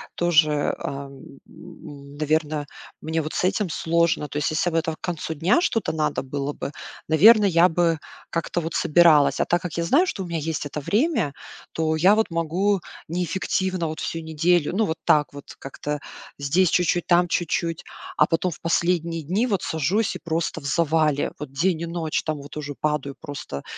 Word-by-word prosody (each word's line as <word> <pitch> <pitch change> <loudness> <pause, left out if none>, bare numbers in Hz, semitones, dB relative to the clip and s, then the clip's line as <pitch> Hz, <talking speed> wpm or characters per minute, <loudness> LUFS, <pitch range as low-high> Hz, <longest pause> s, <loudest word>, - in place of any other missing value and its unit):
тоже, 155 -4 +2
ам, 140 -1 -6 0.3
м, 145 -5 -13
наверно, 155 -1 0 0.4
мне 160 +1 -1
вот 155 - -6
с - - -1
этим 195 +1 +1
сложно. 165 -1 +1
То 145 - -5
есть 150 - 0
если 155 +3 +1
бы 165 - -1
это 165 -1 0
к - - -38
концу 165 -2 -3
дня 170 - +2
что-то 230 - 0
надо 155 -3 -1
было 140 +2 -3
бы, 140 - -5 0.4
наверно, 210 +7 +7
я 175 -2 +5
бы 165 -2 +1 0.3
как-то 170 +1 -2
вот 165 +1 -5
собиралась. 155 -4 +4
А - - +2
так 175 0 +1
как 175 -3 -5
я 170 - -1
знаю, 300 - +3
что 195 - -3
у - - -6
меня 165 -1 -2
есть 155 -1 -3
это 145 - -5
время, 205 - 0 0.4
то 160 -1 0
я 190 +6 +5
вот 220 - +1
могу 180 +5 +1 0.3
неэффективно 180 0 -1
вот 155 - -6
всю 165 - -3
неделю, 160 +1 +1
ну, 215 +3 +2
вот 160 -2 -3
так 150 -1 +3
вот 145 - -10
как-то: 150 +2 -5 0.4
здесь 165 +6 +2
чуть-чуть, 175 0 +1
там 175 0 +4
чуть-чуть, 165 -1 -1 0.3
а - - +5
потом 180 +1 -2
в - - -10
последние 170 -1 0
дни 195 - 0
вот 200 -6 -1
сажусь 180 +7 0
и - - -6
просто 160 -1 -2
в - - -12
завале, 155 -1 +1
вот 150 -3 -7
день 165 +4 0
и - - -2
ночь, 165 -2 -2
там 155 -1 -2
вот 145 +1 -11
уже 145 -1 -5
падаю 150 -2 -1
просто 140 - -7
165 Hz, 190 wpm, -23 LUFS, 150-175 Hz, 0.4 s, наверно